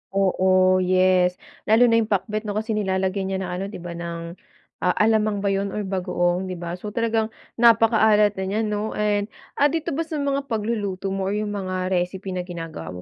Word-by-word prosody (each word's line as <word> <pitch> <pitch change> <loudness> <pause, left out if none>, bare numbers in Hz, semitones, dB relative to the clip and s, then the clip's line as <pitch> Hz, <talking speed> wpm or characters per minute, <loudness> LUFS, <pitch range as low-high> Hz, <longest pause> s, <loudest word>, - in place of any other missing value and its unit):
Oo, 185 -1 +3
yes 185 0 +3 0.3
lalo 220 +3 +5
na 230 - +5
yung 220 - 0
pakbet, 215 +1 -1
'no, 205 - -3
kasi 220 +2 -2
nilalagyan 190 -2 -1
'yan 190 - -2
ng 180 - -5
ano, 180 +2 -3
'di 200 - -8
ba, 175 - -6
ng, 170 0 -6 0.4
a 180 - +1
alamang 215 -2 +2
ba 200 - +1
yun 195 0 -1
or 210 - -2
bagoong, 185 -2 -1
'di 185 - -4
ba? 175 0 -5
So, 210 +3 -7
talagang 225 -1 0 0.2
napakaalat 220 -3 +4
na 190 - -2
n'yan, 215 +3 0
'no? 210 +1 -2
And, 205 -1 0 0.3
ah, 290 - +6
dito 320 +1 -2
ba 320 +3 -2
sa 320 - -5
mga 280 0 -1
pagluluto 205 -5 -2
mo 195 0 -2
or 200 - -1
yung 210 0 -2
mga 185 -2 -3
recipe 185 +1 -2
na 180 -1 -3
ginagawa 165 - -7
195 Hz, 200 wpm, -23 LUFS, 185-215 Hz, 0.4 s, ah